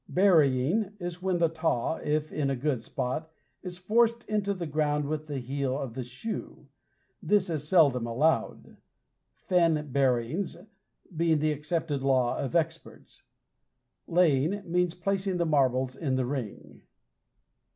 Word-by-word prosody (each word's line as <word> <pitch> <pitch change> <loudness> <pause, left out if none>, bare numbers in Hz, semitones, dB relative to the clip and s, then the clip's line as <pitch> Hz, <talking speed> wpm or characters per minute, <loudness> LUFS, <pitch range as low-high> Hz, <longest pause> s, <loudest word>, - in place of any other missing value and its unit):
Burying 180 - +3
is 175 0 -5
when 185 -1 0
the 170 -1 +3
taw, 160 -3 -1
if 150 +1 -2
in 140 -2 0
a 135 - 0
good 130 -1 -1
spot, 130 +7 -3 0.3
is 180 -2 -6
forced 230 +5 +1
into 205 -2 0
the 180 -3 -3
ground 150 -1 0
with 155 +1 -3
the 145 -2 -4
heel 135 +1 -2
of 135 -5 -5
the 130 +1 -4
shoe. 125 - -7 0.6
This 200 -4 +2
is 150 -2 -3
seldom 140 -9 +4
allowed; 145 +8 0 0.5
"Fen 165 -5 +1
buryings" 135 +6 0 0.6
being 165 0 +2
the 155 +1 +1
accepted 150 -1 -2
law 130 -3 +2
of 140 - -3
experts. 165 0 -3 0.8
Laying 170 +3 +2
means 175 0 0
placing 190 0 -1
the 170 - +1
marbles 130 -4 +1
in 135 -3 -1
the 130 -1 0
ring. 125 -5 -6
155 Hz, 140 wpm, -28 LUFS, 135-175 Hz, 0.8 s, seldom